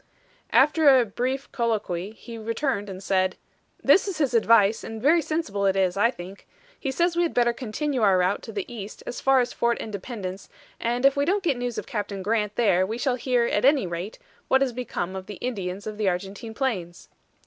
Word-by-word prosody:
After 285 -1 +6
a 245 - +2
brief 255 +6 -3
colloquy 215 -5 -2
he 230 +1 -10
returned 225 -1 -2
and 190 0 -8
said: 185 -1 +1 0.5
"This 395 - +5
is 380 -5 -3
his 285 -5 0
advice, 225 -2 +4
and 225 0 -6
very 310 +8 +4
sensible 310 -12 -1
it 190 - +2
is, 185 -2 +1
I 205 +4 +4
think. 190 -4 -10 0.3
He 275 - -3
says 340 +6 +1
we 345 - +2
had 340 - 0
better 240 -1 +3
continue 255 +3 -3
our 195 -3 +5
route 185 +2 +1
to 225 - -8
the 200 -3 -3
east 215 -3 -8
as - - -6
far 270 -1 +4
as 245 - -3
Fort 235 0 +1
Independence, 200 -2 -6 0.3
and 240 +3 0
if 275 - +5
we 280 - +1
don't 385 +6 +1
get 310 -7 +2
news 245 -1 -4
of - - -4
Captain 205 -6 -4
Grant 210 0 0
there 195 -6 +3
we 215 +5 -3
shall 260 +1 0
hear, 245 -1 +1
at - - 0
any 275 -4 +4
rate, 175 +4 -5 0.3
what 265 - +3
has 265 -3 +1
become 190 -7 -4
of 190 0 -7
the 205 - -7
Indians 195 -4 -4
of 215 0 -6
the 205 -3 +2
Argentine 195 +5 -5
plains." 185 -11 -3
230 Hz, 210 wpm, -25 LUFS, 195-265 Hz, 0.5 s, After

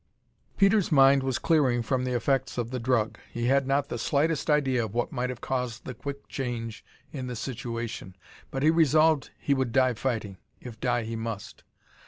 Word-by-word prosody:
Peter's 195 -1 +3
mind 135 -1 +6
was 130 -2 -1
clearing 135 -8 +2
from 130 +2 0
the 125 -1 -1
effects 130 +2 0
of 120 -1 -2
the 130 - -2
drug. 115 -2 0
He 120 0 -3
had 135 +1 +3
not 140 +1 +1
the 120 - -4
slightest 150 +6 0
idea 135 -5 +2
of 105 +1 -9
what 120 - 0
might 125 +1 -2
have 125 -1 -6
caused 125 -3 -3
the 130 - -5
quick 140 +4 -7
change 115 -4 -4 0.3
in 130 -3 -5
the 125 - -4
situation 115 -5 -5 0.3
but 135 +1 -3
he 155 - +6
resolved 155 -2 +3
he 140 - 0
would 130 -3 0
die 130 +1 +3
fighting, 110 -5 -3 0.2
if 115 -3 -10
die 120 -2 0
he 115 +1 -4
must. 115 -3 -6
125 Hz, 190 wpm, -27 LUFS, 120-140 Hz, 0.3 s, mind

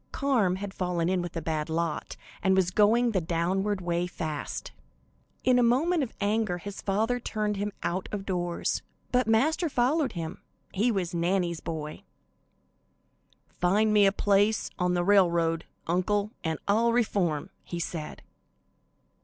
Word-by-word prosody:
Carm 235 -10 +1
had 195 0 -6
fallen 180 -2 -1
in 185 -1 +1
with 175 -1 -5
a 165 - -3
bad 155 -1 -2
lot, 165 -1 -2 0.2
and 190 0 +3
was 185 -1 +2
going 225 +5 +4
the 190 -4 +1
downward 185 +4 0
way 175 0 -1
fast. 155 -4 -5 0.7
In 250 -1 +4
a - - +5
moment 290 +9 +3
of 260 - -2
anger 210 -3 0
his 200 +3 -7
father 220 +5 0
turned 210 -3 -2
him 205 +1 -2
out 185 +2 -2
of 200 -2 -4
doors, 175 -2 -1 0.3
but 250 -1 +2
Master 310 +10 +2
followed 265 +1 +1
him 165 -2 -5 0.3
he 220 +5 +2
was 190 -4 -2
Nannie's 170 0 0
boy. 155 -2 -5 1.6
"Find 210 +4 +3
me 205 -1 +6
a - - +4
place 205 +2 +2
on 180 0 +1
the 175 - +1
railroad, 170 -4 +3 0.2
uncle, 200 +4 0
and 160 -2 -1
I'll 230 +3 +3
reform," 190 -10 0
he 175 - -5
said. 165 -2 -5
195 Hz, 150 wpm, -28 LUFS, 175-220 Hz, 1.6 s, me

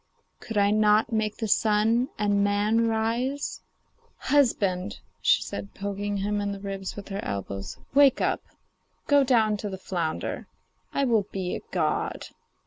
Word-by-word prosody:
could 225 -3 -5
I 200 0 +4
not 215 +1 +3
make 220 -1 -1
the 225 - -2
sun 220 +4 +2
and 205 -1 +2
man 210 +3 +2
rise?' 235 +6 -1 0.6
'Husband,' 200 -10 +1 0.2
said 485 - +1
she, - - -20
poking 200 0 -2
him 205 +1 -1
in 200 0 -2
the 200 - -7
ribs 195 -1 -5
with 205 -1 -9
her 195 +1 -4
elbows, 100 0 -5 0.2
'wake 280 -1 +6
up. - - 0 0.6
Go 285 -1 +5
down 225 -5 +3
to 205 0 -4
the 190 - -5
flounder; 175 -4 -3 0.4
I 280 - +1
will 225 -5 +2
be 185 -2 -3
a - - -6
god. 160 -4 -1
210 Hz, 150 wpm, -26 LUFS, 195-225 Hz, 0.6 s, wake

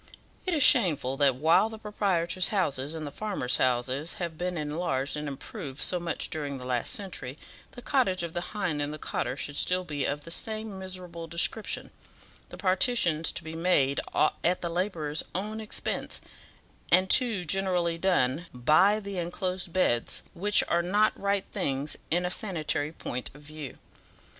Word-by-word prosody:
It 360 - +2
is 295 - +4
shameful 155 - +5
that 140 -3 +4
while 160 - +4
the 220 - -8
proprietors' 185 -5 +1
houses, 150 -7 -1
and 155 -1 -4
the 145 - -5
farmers' 185 -11 -1
houses, 130 +5 +1
have 170 -3 -4
been 180 +2 -2
enlarged 150 -3 -1
and 150 0 -4
improved 140 0 -7
so 180 - +1
much 170 -1 -2
during 145 -3 -3
the 125 - -8
last 125 -2 0
century, 185 - -3 0.4
the 245 - -10
cottage 195 -10 +2
of 170 -1 -4
the 175 - -2 0.2
hind 170 -8 0
and 145 0 -2
the 155 - -5
cotter 135 - -2
should 145 -1 -4
still 185 0 +2
be 145 -5 -2
of 145 +1 -1
the 165 - -8
same 215 +1 -2
miserable 180 -3 -7
description; 170 +6 -1 0.6
the - - -9
partitions 185 -5 +3
to - - -4
be 160 0 -7
made 165 -5 +2 0.4
at 180 +2 +2
the 170 - -2
labourer's 165 -4 -1
own 215 +4 -3
expense, 215 - -2 0.7
and 185 +2 +6
too 220 -4 +3
generally 175 -1 +1
done 170 -3 +1
by 155 - +5
the 200 -3 -5
enclosed 180 +1 -2
beds, 140 -10 +1
which 205 +4 +3
are 170 - +2
not 205 +5 +3
right 200 0 0
things 140 +2 -1
in 175 +2 +2
a 180 - -1
sanitary 155 -7 -1
point 125 -5 -4
of 145 - -14
view. 150 -3 -8
170 Hz, 165 wpm, -28 LUFS, 145-190 Hz, 0.7 s, and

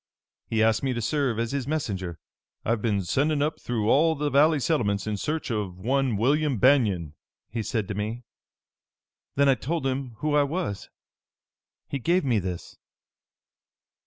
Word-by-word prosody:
He 110 -1 +1
asked 110 -1 +3
me 135 -2 0
to 120 - -3
serve 135 -2 0
as 115 0 -1
his 140 -2 -2
messenger. 95 - -3 0.5
'I've 115 -1 0
been 105 -4 0
sending 145 - +1
up 150 +1 -2
through 110 -3 -1
all 160 +7 +4
the 145 0 -1
valley 150 +2 +4
settlements 105 - 0
in 110 -1 -1
search 150 +6 -3
of 100 -5 -3
one 130 +3 0
William 140 +4 +2
Banion,' 105 - +3 0.4
he 115 0 -2
said 110 -2 -2
to - - -3
me. 110 +4 -4 1.1
Then 140 0 +4
I 135 - +6
told 135 +5 -3
him 130 -2 -2
who 150 -1 0
I 145 - +5
was. 145 - -3 1.0
He 140 - -3
gave 170 +5 +1
me 120 -5 +2
this." 90 -2 -6
125 Hz, 160 wpm, -26 LUFS, 105-145 Hz, 1.1 s, I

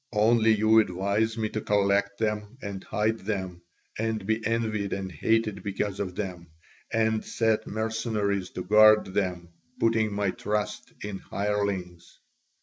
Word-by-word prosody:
Only 110 +1 +4
you 110 +1 +5
advise 105 +3 0
me 110 -1 -1
to 110 - -3
collect 100 0 +1
them 105 +1 -2
and 100 -1 -5
hide 110 +2 0
them, 95 -4 -4 0.4
and 110 -2 -1
be 110 +2 0
envied 110 -3 -1
and 95 -1 -4
hated 105 +4 0
because 100 0 -3
of 90 -3 -3
them, 90 -4 -5 0.4
and 110 -1 +1
set 110 -1 0
mercenaries 110 -3 -1
to 90 - -3
guard 110 0 +6
them, 90 -3 -1 0.3
putting 110 -1 +2
my 100 -1 0
trust 105 0 -3
in 100 -2 -5
hirelings. 100 -4 -3
105 Hz, 140 wpm, -27 LUFS, 100-110 Hz, 0.4 s, guard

